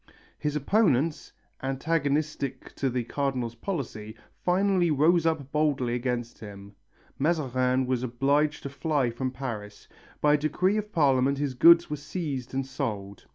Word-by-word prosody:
His 150 -1 -2
opponents, 155 - +1 0.3
antagonistic 140 -1 -1
to 135 - -1
the 125 -1 -1
Cardinal's 130 -2 -2
policy, 115 - -5 0.3
finally 185 -1 +2
rose 160 +3 +3
up 145 -4 -1
boldly 145 -5 +1
against 120 -1 -3
him. 100 -1 -10 0.5
Mazarin 130 -4 +1
was 125 -1 -1
obliged 140 +5 +1
to 140 - -4
fly 140 -4 0
from 130 +3 -3
Paris. 115 -6 -7 0.3
By 150 0 +4
a - - +5
decree 180 +7 +1
of 210 0 -4
Parliament 140 -4 +3
his 140 -2 -1
goods 170 +5 +6
were 150 - -1
seized 145 -4 -5
and 135 0 -1
sold. 100 -7 -5
140 Hz, 140 wpm, -27 LUFS, 125-155 Hz, 0.5 s, goods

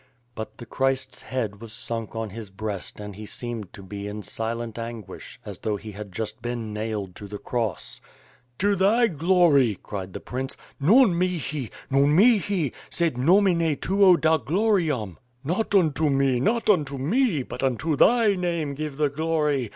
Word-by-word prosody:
But 110 -2 -7
the 120 - -9
Christ's 135 +2 -1
head 110 -5 -4
was 115 -2 -9
sunk 115 -1 -5
on 110 -2 -3
his 110 -1 -8
breast 100 0 -5
and 105 -1 -7
he 105 +1 -8
seemed 115 -5 -5
to 100 - -11
be 100 +1 -6
in 105 +1 -6
silent 115 +1 -3
anguish, 115 -3 -8
as - - -8
though 110 -1 -1
he 105 +2 -8
had 105 0 -8
just 110 +4 -5
been 120 -2 -4
nailed 105 -4 -4
to 105 - -8
the 105 +1 -6
cross. 110 -5 -3 0.6
"To 200 +1 +2
thy 215 +5 +4
glory," 165 - +3
cried 95 0 -7
the - - -5
nrince, 130 +2 -5 0.2
^'Non 215 - +6
mxhi! 165 - -2 0.2
Non 140 +2 +4
mihi! 200 - +3 0.2
sed 170 -5 0
nomine 170 +2 +3
Tuo 190 -2 +5
da 160 0 +4
gloriam. 155 - 0 0.2
Not 185 +8 -1
unto 160 -4 +3
me, 135 -2 +2
not 225 - +1
unto 150 -9 +2
me, 175 - +1
but 125 - -7
unto 135 +4 0
thy 225 - +5
name 170 -6 -1
give 150 -1 -5
the 150 -1 +2
glory. 150 -4 0
135 Hz, 165 wpm, -25 LUFS, 110-170 Hz, 0.6 s, ^'Non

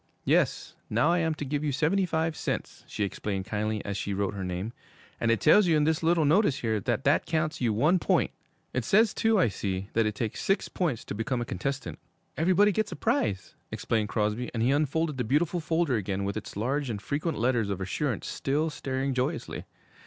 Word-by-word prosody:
'Yes, - - +1 0.2
now 160 - +3
I 175 - +3
am 160 -1 0
to 145 - -5
give 145 +2 -2
you 150 - 0
seventy 165 +7 +1
five 160 -1 0
cents,' - - -4
she 105 - -2
explained 100 -1 -3
kindly, 110 0 -2
as 100 - -3
she 100 0 -2
wrote 100 0 -1
her 100 -1 -4
name, 90 +5 -4 0.5
'and 115 - +1
it 115 -2 +3
tells 185 +5 +6
you 160 -2 +4
in 150 - +3
this 160 +1 +1
little 165 -1 +3
notice 155 0 +3
here 110 -2 0
that 95 - -1
that - - +2
counts 155 -2 -1
you 120 -3 +2
one 150 - +3
point. - - +2 0.4
It 125 - 0
says, 210 - +4
too, 225 -1 +2
I 175 - +4
see, 95 -1 -3
that 115 -1 +2
it 105 - -3
takes 110 0 -3
six 195 - 0
points 155 - -2
to - - -5
become 115 +4 -2
a 120 - -2
contestant.' 95 - -4 0.4
'Everybody 185 +5 +4
gets 210 +1 -1
a - - -4
prize,' 105 -9 -1 0.2
explained 110 -2 -1
Crosby; 110 +3 -1
and 115 - 0
he 125 - +3
unfolded 150 +1 0
the 125 - 0
beautiful 155 +8 +1
folder 160 -5 +1
again 100 -1 -2
with 100 0 -2
its 110 -2 -6
large 135 +5 -1
and 105 -3 -3
frequent 150 - -2
letters 120 -3 +1
of 100 -2 -2
assurance 110 +6 -2
still 150 +4 -1
staring 135 -1 -2
joyously. 130 +6 -2
130 Hz, 210 wpm, -28 LUFS, 105-160 Hz, 0.5 s, tells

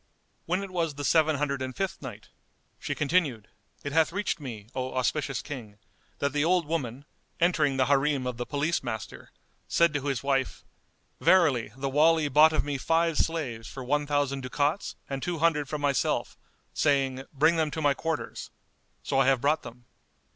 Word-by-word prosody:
When 180 +4 0
it 195 - -7
was 165 -5 -1
the 145 - -5
Seven 155 0 +4
Hundred 140 -1 -1
and 130 -1 -4
Fifth 195 -1 -3
Night, 115 -6 -9 0.5
She - - -3
continued, 145 - 0 0.3
It 145 - -4
hath 160 +2 +3
reached 200 -1 -2
me, 115 -8 -7
O 130 0 -4
auspicious 135 +2 -1
King, 115 -8 -8 0.4
that 140 0 -1
the 145 0 +1
old 175 0 +2
woman, 140 -4 -3 0.3
entering 155 -5 +2
the 130 - +3
Harim 140 -1 +2
of 125 -2 -3
the 120 - -3
Police 150 +4 0
Master, 110 -4 -6 0.4
said 170 -2 +3
to 145 -1 -2
his 135 -3 -1
wife, 135 -2 0 0.6
"Verily 145 - +4
the 135 +1 -2
Wali 155 +2 +3
bought 150 +3 +6
of 155 - +1
me 145 -2 -2
five 165 +3 +1
slaves 130 -9 -2
for 135 - -7
one 145 +3 0
thousand 140 -2 0
ducats 145 +7 -1
and 135 -1 -4
two 175 +2 -2
hundred 155 -3 +1
for 150 - -2
myself, 145 -2 0 0.4
saying, 135 -3 +1
'Bring 155 +4 +3
them 160 -1 +1
to 160 - -5
my 145 -2 +3
quarters.' 160 +2 -4 0.5
So 135 - 0
I 135 - +4
have 135 -2 +4
brought 150 +3 +2
them." 120 +1 -12
145 Hz, 180 wpm, -28 LUFS, 130-160 Hz, 0.6 s, bought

